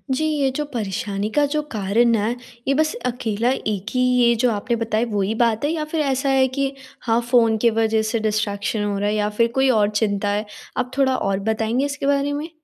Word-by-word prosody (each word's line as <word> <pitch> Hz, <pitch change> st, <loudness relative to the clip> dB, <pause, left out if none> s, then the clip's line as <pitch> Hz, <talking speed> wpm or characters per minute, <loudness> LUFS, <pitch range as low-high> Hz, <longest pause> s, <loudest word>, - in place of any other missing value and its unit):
जी 315 Hz, -, 0 dB
ये 295 Hz, -3 st, +1 dB
जो 300 Hz, -, -1 dB
परेशानी 205 Hz, -2 st, -3 dB
का 295 Hz, -, +4 dB
जो 305 Hz, -, +1 dB
कारण 225 Hz, +3 st, +2 dB
है, 220 Hz, +3 st, 0 dB, 0.3 s
ये 275 Hz, -, +3 dB
बस 310 Hz, +6 st, +1 dB
अकेला 240 Hz, -2 st, -1 dB
एक 210 Hz, -7 st, -3 dB
ही 255 Hz, -, 0 dB
ये 250 Hz, -1 st, +4 dB
जो 245 Hz, -, +4 dB
आपने 225 Hz, +3 st, -1 dB
बताया 230 Hz, 0 st, 0 dB
वो 205 Hz, -1 st, 0 dB
ही 200 Hz, +3 st, 0 dB
बात 230 Hz, +2 st, +1 dB
है 305 Hz, -, +1 dB
या 320 Hz, -2 st, -2 dB
फ़िर 310 Hz, +1 st, -2 dB
ऐसा 275 Hz, -1 st, 0 dB
है 265 Hz, -1 st, +4 dB
कि 275 Hz, 0 st, +1 dB, 0.4 s
हाँ 230 Hz, 0 st, +3 dB
फ़ोन 230 Hz, -3 st, +4 dB
के 235 Hz, -, +5 dB
वजह 220 Hz, 0 st, +2 dB
से 230 Hz, -, 0 dB
डिस्ट्रैक्शन 215 Hz, -1 st, -1 dB
हो 205 Hz, -1 st, -1 dB
रहा 205 Hz, 0 st, 0 dB
है 215 Hz, -, 0 dB
या 210 Hz, 0 st, 0 dB
फ़िर 230 Hz, +2 st, +2 dB
कोई 265 Hz, 0 st, +3 dB
और 215 Hz, -4 st, +3 dB
चिंता 205 Hz, -1 st, 0 dB
है? 205 Hz, +1 st, -1 dB, 0.3 s
आप 250 Hz, -, -1 dB
थोड़ा 265 Hz, -2 st, +3 dB
और 195 Hz, -1 st, -1 dB
बताएँगे 225 Hz, +4 st, 0 dB
इसके 285 Hz, 0 st, -4 dB
बारे 280 Hz, 0 st, +1 dB
में। 300 Hz, +3 st, -4 dB
235 Hz, 230 wpm, -21 LUFS, 210-270 Hz, 0.4 s, के